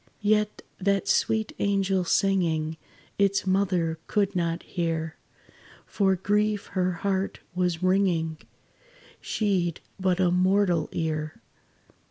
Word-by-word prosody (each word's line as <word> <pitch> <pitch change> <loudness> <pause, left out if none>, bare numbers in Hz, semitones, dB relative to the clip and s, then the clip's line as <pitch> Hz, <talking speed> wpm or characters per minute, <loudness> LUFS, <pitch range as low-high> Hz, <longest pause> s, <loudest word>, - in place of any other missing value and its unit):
Yet 210 0 +1 0.2
that 200 0 +1
sweet 220 -1 +1
angel 195 -2 +1
singing 165 -5 +1 0.4
Its 200 -1 +2
mother 185 -4 +1
could 200 -1 0
not 170 -1 -1
hear, 165 -3 -2 0.7
For 195 -2 +1
grief 210 +2 0
her 185 -1 +1
heart 190 +2 -2
was 180 -1 -1
wringing 180 -4 +1 0.8
She 195 -5 0
'd 165 - -9 0.2
but 185 -1 +1
a 180 -2 +3
mortal 185 -2 +2
ear. 155 -1 -3
185 Hz, 110 wpm, -26 LUFS, 170-200 Hz, 0.8 s, a